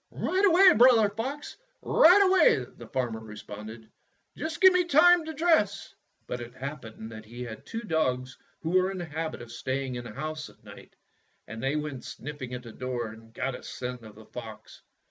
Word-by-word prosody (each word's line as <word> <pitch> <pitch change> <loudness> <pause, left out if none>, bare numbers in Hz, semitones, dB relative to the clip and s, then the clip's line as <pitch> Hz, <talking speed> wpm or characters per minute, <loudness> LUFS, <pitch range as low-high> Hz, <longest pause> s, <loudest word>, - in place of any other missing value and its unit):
''Right 380 +2 -1
away. 375 +1 +7
Brother 230 -2 +6
Fox, 260 +8 -5 0.3
right 365 +5 +6
away," 370 - +4
the 120 - -11
farmer 120 -2 -2
responded. 110 +1 -10 0.5
"Just 315 -1 -5
give 375 -1 +8
me 360 0 +3
time 345 +2 +6
to 320 - -5
dress." 315 - +1 0.3
But 125 - -5
it 120 +1 -9
happened 125 -5 -7
that 110 -1 -9
he 120 +3 -8
had 115 -2 -9
two 225 - -5
dogs 130 - -1 0.2
who 165 - -3
were 185 +1 +3
in 195 - -5
the 175 - -4
habit 160 -3 -5
of 120 - -12
staying 130 +2 -3
in 120 0 -5
the 115 - -8
house 155 +4 -5
at - - -22
night, - - -14 0.5
and 110 +1 -7
they 135 +3 0
went 150 -4 -4
sniffing 135 -3 -7
at 125 - -8
the 115 - -10
door 120 -1 -4
and 115 +1 -15
got 130 +3 -3
a - - -8
scent 125 -1 -6
of 110 -2 -13
the 110 +1 -14
fox. 110 -3 -10
135 Hz, 195 wpm, -28 LUFS, -, 0.5 s, give